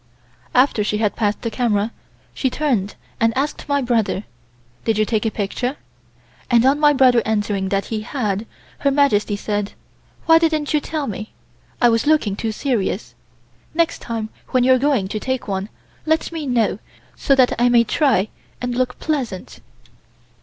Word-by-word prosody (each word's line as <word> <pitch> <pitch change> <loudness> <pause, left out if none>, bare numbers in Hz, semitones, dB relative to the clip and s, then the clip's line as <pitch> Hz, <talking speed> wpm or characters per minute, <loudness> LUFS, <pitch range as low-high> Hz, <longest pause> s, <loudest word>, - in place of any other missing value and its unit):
After 255 -4 +4
she 210 0 -1
had 210 -1 0
passed 210 0 -1
the 230 - -2
camera 220 -2 0 0.4
she 265 - 0
turned 245 -9 -1 0.2
and 225 +1 +2
asked 290 +1 -2
my 285 -1 +2
brother: 225 -5 0 0.6
"Did 225 -2 +1
you 215 - +3
take 220 0 0
a - - +2
picture?" 245 +6 -3 0.7
and 240 0 +4
on 275 +2 +4
my 295 -1 +6
brother 255 -4 +5
answering 205 -3 -1
that 195 0 0
he 215 - -1
had, 215 -3 -2 0.3
Her 280 - +2
Majesty 270 -8 +2
said: 205 0 -3 0.5
"Why 325 0 +6
didn't 310 -3 0
you 300 - +4
tell 305 0 -3
me? 215 -2 -6 0.5
I 240 - +5
was 230 +3 +1
looking 295 -11 +3
too 220 +2 -2
serious. 215 - -2 0.6
Next 335 -1 +1
time 225 -2 -4 0.2
when 255 -2 +2
you 260 +1 +5
are 255 - +3
going 265 -8 +1
to 215 +2 -3
take 260 +2 -3
one, 195 +1 -3 0.4
let 315 +1 +1
me 320 -3 -4
know 230 -5 +1 0.4
so 275 - +2
that 255 -2 +4
I 245 - +5
may 240 -1 +5
try 230 - +2 0.3
and 245 0 -3
look 250 0 -1
pleasant." 255 - -3
235 Hz, 170 wpm, -20 LUFS, 210-275 Hz, 0.7 s, my